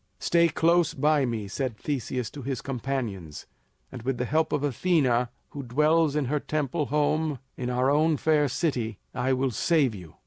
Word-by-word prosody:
"Stay 170 0 +3
close 165 0 +2
by 150 -1 +2
me," 110 -4 -3
said 125 +2 -3
Theseus 130 -3 -3
to 145 - -8
his 135 0 -4
companions, 120 - -4 0.5
"and 130 - -8
with 130 +2 -2
the 125 - -1
help 155 +5 +1
of 145 -1 0
Athena 130 -4 +2 0.2
who 145 - -6
dwells 150 +4 +2
in 150 -2 +1
her 150 +4 0
temple 150 0 -2
home 150 +1 +1 0.2
in 125 -1 -4
our 125 +2 +2
own 155 +1 +3
fair 150 -1 +2
city, 120 - -1 0.2
I 130 +2 0
will 130 0 0
save 140 +1 +2
you." 90 -6 -11
135 Hz, 175 wpm, -27 LUFS, 125-155 Hz, 0.5 s, Stay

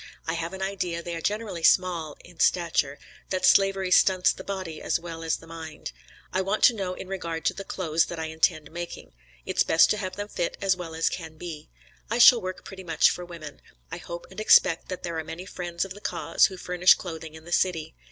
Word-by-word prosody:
I 165 - -1
have 170 +1 -4
an 190 0 -4
idea 180 -3 -3
they 175 - -5
are 165 - -5
generally 205 -2 -2
small 170 -3 +2
in 175 -1 -17
stature; 160 -5 +2 0.3
that 185 -1 0
slavery 195 -1 +4
stunts 185 0 +5
the 190 - -10
body 185 -6 -5
as - - 0
well 165 -1 -8
as 165 -1 -1
mind. 165 -1 -8 0.4
I 185 - +1
want 195 +3 -1
to 245 - +8
know 190 -4 -3
in 185 - -8
regard 170 -4 -4
to - - +2
the 195 - -7
clothes 165 -4 0
that 170 - -6
I 160 - -3
intend 160 -1 0
making; 170 - -7 0.3
it's - - 0
best 160 - +5
to 210 - +1
have 185 -2 -4
them 205 0 -5
fit 175 -4 -3
as 195 -2 +2
well 170 -3 -7
as 165 - +1
can 160 -3 -4
be. 155 -3 -8 0.4
I 230 - 0
shall 240 -1 +8
work 185 -1 -6
pretty 190 -1 -9
much 165 -3 +3
for 180 - -5
women. 165 -4 -10 0.3
I - - -4
hope 170 0 -8
and 190 - -9
expect 175 -5 +5 0.2
there 170 -2 -3
are - - -3
many 165 +3 -8
friends 175 -1 -4
of 190 - -8
the 205 - -13
cause - - +2
who 190 - -9
furnish 180 0 +4
clothing 160 -3 -8
in 160 0 -13
the 175 - -10
city. 165 -3 0
175 Hz, 220 wpm, -26 LUFS, 165-190 Hz, 0.4 s, to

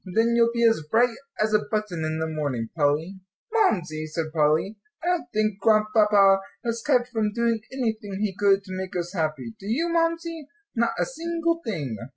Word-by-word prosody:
Then 225 +5 +1
you'll 235 0 +4
be 235 0 0
as 225 -7 +2
bright 235 +3 +3 0.2
as 215 0 +1
a 215 - +5
button 210 -7 -2
in 155 0 -2
the 160 - -1
morning, 145 -8 -3
Polly." 160 +5 0 0.3
"Mamsie," 175 - +1
said 155 0 -4
Polly, 160 +7 +1 0.2
"I - - -5
don't 350 -7 0
think 215 -2 0
Grandpapa 210 -2 +4 0.3
has 230 0 -1
kept 250 -4 +2
from 220 -4 0
doing 235 0 +1
anything 220 -6 -3
he 210 -2 -1
could 200 -1 +3
to 185 -2 -7
make 185 0 -5
us 175 +1 -3
happy, 155 - -2
do 195 - -9
you, 310 +11 0
Mamsie? 330 -2 -1 0.3
not 235 0 +1
a - - +1
single 335 -6 -2
thing." 145 - -3
215 Hz, 185 wpm, -25 LUFS, 170-235 Hz, 0.3 s, a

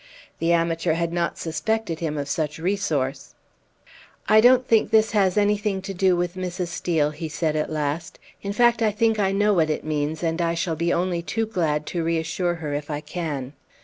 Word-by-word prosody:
The 165 +1 +1
amateur 165 0 +1
had 170 +1 -1
not 170 -2 -1
suspected 170 +2 -2
him 155 -3 -2
of 140 -1 -3
such 150 0 -2
resource. 160 -7 -2 0.9
"I 215 +1 +6
don't 250 +1 +5
think 225 -2 +3
this 220 0 +4
has 195 -3 +2
anything 205 -1 +1
to 195 0 -5
do 185 0 +3
with 175 0 -1
Mrs. 180 -1 -4
Steel," 160 -3 0
he 160 +1 -6
said 155 0 -1
at 155 - -1
last; 155 +1 -3 0.2
"in 200 - -3
fact, 240 +2 +3
I 220 - +4
think 225 +1 +1
I 195 -1 +2
know 205 +1 +2
what 160 -4 +2
it 155 - -2
means, 155 +1 -2
and 165 +1 0
I 170 0 0
shall 165 -1 -1
be 170 +2 0
only 175 0 0
too 225 +6 -2
glad 160 -8 -1
to 170 +1 -3
reassure 165 +2 -1
her, 155 -3 -5
if 145 +1 -4
I 145 -1 -2
can." 150 -6 -4
170 Hz, 200 wpm, -24 LUFS, 155-200 Hz, 0.9 s, I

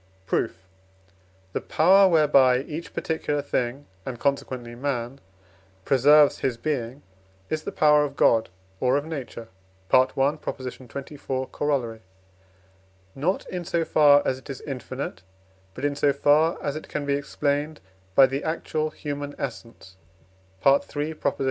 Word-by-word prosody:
Proof. 95 0 -2 0.9
The - - -2
power, 190 +4 +5
whereby 140 -6 +4
each 155 +3 -7
particular 150 -3 -2
thing, 130 +3 -2 0.2
and 120 0 -6
consequently 130 -4 -2
man, 125 0 -3 0.7
preserves 145 +2 +5
his 125 -3 -1
being, 130 -1 -3 0.5
is 155 - -1
the - - -5
power 150 -1 +4
of 140 -1 -4
God 115 -5 +3 0.3
or 130 +1 +2
of 145 - -3
Nature 130 -7 -7 0.4
(I. - - +7
xxiv. 130 0 -2
Coroll.); 125 -6 -1 1.1
not 170 +8 -1
in 180 -1 -5
so 170 0 -1
far 145 -2 +5
as 130 - 0
it 130 - -17
is 135 - -6
infinite, 130 -6 -6 0.5
but 135 - -4
in 145 0 0
so 145 0 +3
far 150 +4 +3
as 145 -1 -2
it 155 - -7
can 145 - -3
be 140 - 0
explained 145 +2 -2 0.4
by 135 - +8
the 135 +2 -3
actual 155 -1 -2
human 145 -1 -6
essence 115 -7 -8 0.7
(III. 145 +2 +2
140 Hz, 130 wpm, -25 LUFS, 130-150 Hz, 1.1 s, by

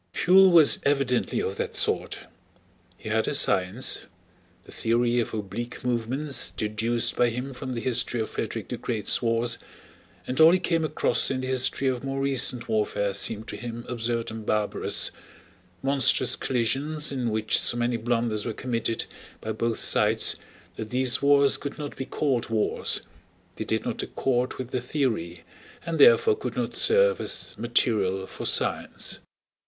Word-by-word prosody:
Pfuel 190 +1 +5
was 165 -4 +6
evidently 135 -3 0
of - - -4
that - - -4
sort. - - +2 0.8
He - - -8
had - - 0
a - - 0
science—the 95 +7 0
theory 120 +1 +1
of 115 - -2
oblique 110 +3 -6
movements 125 +4 0
deduced 110 +2 -1
by 120 - +3
him 125 +4 -5
from 130 0 -6
the 115 - -4
history 120 -1 0
of 110 - -2
Frederick - - -5
the - - -4
Great's 110 -4 0
wars, 115 0 +1 0.7
and 130 - -3
all 160 +2 +8
he - - +4
came 165 -2 0
across 150 -5 0
in 130 -1 -2
the 130 - -4
history 130 +1 +1
of 130 -1 -1
more 135 0 -3
recent 130 -3 +1
warfare 105 -2 -1
seemed 110 +3 0
to - - -5
him 120 -1 -7
absurd 115 -1 -3
and 110 0 -7
barbarous—monstrous 105 +3 -1
collisions 140 +5 -1
in 125 -4 -2
which 110 0 +1
so 120 - +2
many 120 0 0
blunders 115 -2 -1
were 115 - -4
committed 115 -1 -2 0.3
by - - -5
both 115 -1 -2
sides 110 +1 +3 0.4
that 110 - -6
these 125 0 +1
wars 140 0 +4
could 140 - -7
not 145 -1 -6
be 135 - -5
called 130 -3 -1
wars, 110 -2 0 0.5
they - - -5
did - - -2
not - - -3
accord 125 -1 -1
with 130 -1 -7
the 125 - -2
theory, 110 - -2 0.4
and 165 -1 -3
therefore 455 -2 +6
could - - -6
not - - -3
serve 480 +1 +4
as - - -3
material 105 -5 +1
for - - -6
science. - - 0
120 Hz, 160 wpm, -25 LUFS, 110-135 Hz, 0.8 s, all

